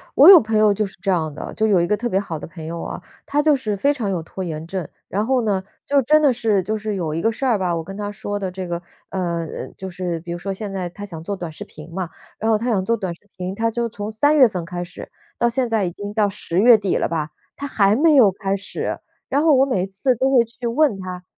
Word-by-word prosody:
我 - - +9
有 375 -4 +11
朋 220 0 0
友 215 -1 +5
就 210 +1 0
是 190 - -10
这 195 - -2
样 160 -5 +1
的， - - -7
就 220 - +1
有 200 -4 +4
一 170 - +1
个 210 - +2
特 240 +3 -3
别 190 - +2
好 170 -6 -4
的 - - -7
朋 165 -1 -10
友 165 +1 -5
啊， - - -6 0.2
他 290 +1 +1
就 300 -1 +4
是 215 -6 -2
非 285 +8 +2
常 220 -7 -3
有 180 -4 -1
拖 190 +3 -7
延 160 -2 -5
症。 185 -2 -3 0.2
然 205 +4 -1
后 260 +1 +2
呢 195 -3 0 0.2
就 280 -1 +3
真 305 +5 +4
的 280 -4 +4
是 220 -5 +1
就 215 +4 -2
是 215 -1 -3
有 165 -5 -2
一 165 - -1
个 225 - +2
事 265 +5 -4
儿 235 -5 +3
吧， 180 -2 0
我 165 - -1
跟 195 +4 -8
他 205 0 -4
说 205 0 -4
的 190 -2 -3
这 185 0 -5
个， 170 0 -3 0.3
呃 170 -3 -2
呃， - - -6
就 190 - -6
是 175 -2 -3
比 170 +1 -6
如 - - -4
说 195 +3 -4
现 200 0 -6
在 185 -2 -3
他 205 +4 -8
想 165 -5 -8
做 200 - -3
短 175 -4 -5
视 155 - -8
频 155 +2 -12
嘛， 185 -3 -3 0.3
然 220 +1 0
后 215 - +4
他 240 +3 -2
想 195 -5 +1
做 230 +3 +1
短 185 -4 -4
视 - - -21 0.2
频， 185 +1 -4
他 225 +1 0
就 235 +1 -1
从 210 0 -6
3 290 +8 +3
月 260 -6 +7
份 180 -4 -4
开 175 +1 -4
始 175 - -10 0.3
到 235 - +2
现 245 0 0
在 220 -4 +1
已 175 - -2
经 205 +3 -7
到 210 -1 +3
10 185 -2 -2
月 235 +1 +8
底 200 -3 0
了 - - 0
吧， 160 -2 -2 0.3
他 285 - -6
还 210 -6 +3
没 310 +4 +4
有 250 -8 +7
开 195 -1 -2
始。 200 - -4 0.3
然 280 - +2
后 310 -3 +5
我 265 - +5
每 195 -10 0
一 - - -3
次 205 +7 0
都 265 +3 +2
会 240 -2 +6
去 235 +1 -6
问 240 -2 +2
他 180 -1 -6
205 Hz, 305 characters per minute, -21 LUFS, 180-230 Hz, 0.3 s, 有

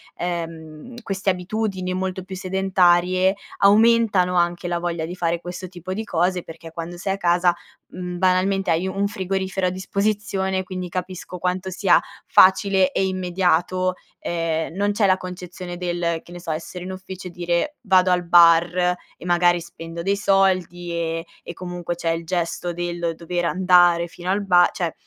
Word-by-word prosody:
ehm, 165 +4 -6
queste 195 -1 -2
abitudini 185 0 -2
molto 185 0 -3
più 190 0 -8
sedentarie, 185 0 +2 0.2
aumentano 205 -3 +4
anche 175 0 +1
la 175 0 -1
voglia 170 -2 -2
di 175 - -6
fare 170 -1 -1
questo 180 +1 -7
tipo 180 +1 -7
di 220 - -3
cose, 180 -2 0
perché 165 0 -11
quando 170 +1 -6
sei 190 +2 -2
a 195 - -4
casa, 175 0 +3 0.4
mhmm, 180 -1 -6
banalmente 185 0 +2
hai 170 +3 +1
un 195 +1 -1
frigorifero 190 -1 -2
a - - +2
disposizione 190 0 -1
quindi 185 -1 -6
capisco 185 0 -5
quanto 180 +1 -2
sia 190 +1 +3 0.2
facile 190 0 +5
e 190 - +1
immediato, 185 0 0 0.3
ehm, 165 -1 -2
non 205 +2 0
c'è 205 -1 +2
la 190 -1 +4
concezione 180 -1 -8
del, 175 -2 -2
che 175 - -16
ne 175 - -8
so, 175 -2 -8
essere 170 +3 -6
in 190 - -5
ufficio 185 0 -8
e 180 - -8
dire: 175 - -1
"Vado 185 -4 +4
al 180 0 +2
bar 170 0 +6 0.4
e - - -12
magari 175 0 +3
spendo 170 -1 -8
dei 195 +3 +1
soldi", 185 -3 +1
ehm, 165 -1 -2 0.2
e - - -7
comunque 175 -1 -5
c'è 170 -1 -2
il 165 0 -3
gesto 175 0 -2
del 175 -1 -3
dover 175 +1 -3
andare 175 -1 +4
fino 175 +2 -8
al 200 +1 +1
ba 175 -2 +5
cioè 175 -3 -2
180 Hz, 170 wpm, -22 LUFS, 175-190 Hz, 0.4 s, bar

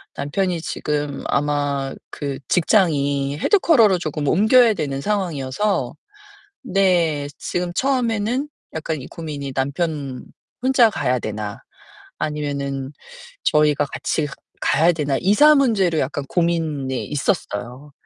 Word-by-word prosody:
남편이 170 +5 -1
지금 145 -3 -3
아마 140 -1 0 0.2
그 140 -2 -4
직장이 145 -7 +2
headquarter로 230 - +4
쪼금 150 -3 -3
옮겨야 220 - +5
되는 140 -6 -3
상황이어서 190 -1 -1 0.7
네 175 - +2
지금 175 0 -3
처음에는 250 +1 0 0.3
약간 160 -2 -3
이 - - -9
고민이 145 -4 -6
'남편 140 -1 -2 0.4
혼자 255 -3 +5
가야 125 -8 0
되나?' 105 -1 -5 0.6
아니면은 140 -3 -3 0.5
'저희가 150 -1 +3
같이 150 +1 -2 0.3
가야 165 +4 +4
되나?' 145 -4 -1
이사 290 +11 +6
문제로 200 - +2
약간 140 +1 -2
고민이 160 -7 -1
있었어요. 140 - -3
150 Hz, 275 characters per minute, -21 LUFS, 140-195 Hz, 0.7 s, 이사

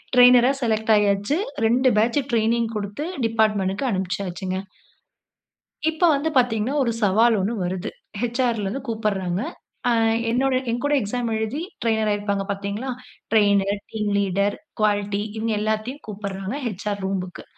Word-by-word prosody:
ட்ரெய்னரா 250 0 +7
select 220 -2 0
ஆயாச்சு. 205 +5 +2 0.3
2 255 +3 +3
batch 230 +6 +3
training 230 0 +2
குடுத்து 205 +7 -4 0.2
department 215 -4 +2
க்கு - - -2
அனுப்பிச்சாச்சுங்க. 185 -1 -3 1.3
இப்ப 320 +2 -11
வந்து 285 +3 0
பார்த்தீங்கன்னா, 245 +1 +1
ஒரு 235 -2 +1
சவால் 220 +4 +4
1 205 +5 0
வருது. 185 +2 -3 0.3
ஹெச்.ஆர்.ல 240 -2 0
இருந்து 265 +8 -3
கூப்பிட்றாங்க. 200 -5 -1 0.5
ஆ - - +4 0.4
என்னோட 260 +2 +2 0.2
என்கூட 245 +5 -1
எக்ஸாம் 235 +2 -2
எழுதி 220 +7 -2 0.2
டிரெய்னர் 220 -2 +1
ஆயிருப்பாஙக 200 -1 -1
பாத்தீங்களா! 200 +6 -4 0.4
டிரெய்னர், 200 -2 +3
டீம் 210 -2 -2
லீடர், 200 +1 +1 0.2
குவாலிட்டி 205 -1 +1 0.2
இவுங்க 225 0 -1
எல்லாத்தையும் 220 +6 -2
கூப்பிட்றாங்க. 200 +1 -5
ஹெச்.ஆர். 205 -1 -3
ரூம்புக்கு. 185 -2 -4
215 Hz, 125 wpm, -23 LUFS, 200-235 Hz, 1.3 s, ட்ரெய்னரா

